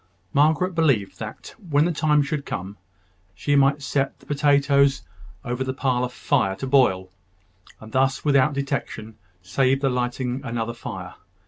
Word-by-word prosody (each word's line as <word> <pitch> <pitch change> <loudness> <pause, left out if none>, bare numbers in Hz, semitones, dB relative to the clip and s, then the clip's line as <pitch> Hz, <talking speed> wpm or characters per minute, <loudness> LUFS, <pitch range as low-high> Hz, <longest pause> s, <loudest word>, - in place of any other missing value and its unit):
Margaret 160 +6 +3
believed 140 -12 +1
that, 110 0 -8
when 155 -7 +1
the 175 - +1
time 150 -2 +2
should 140 0 -3
come, 95 -1 -6 0.6
she 145 +11 0
might 140 +1 +3
set 135 0 -1
the - - -20
potatoes 140 -1 +2 0.4
over 125 +1 -2
the 130 0 -4
parlour 125 -2 0
fire 125 -6 0
to 95 - -5
boil, 110 -9 +2 0.7
and 110 0 -12
thus, 135 +3 +1
without 140 0 +3
detection, 135 -6 -4 0.2
save 130 +8 +1
the 135 -2 +1
lighting 125 +1 -2
another 115 -3 -3
fire. 115 - -7
135 Hz, 145 wpm, -23 LUFS, 120-145 Hz, 0.7 s, Margaret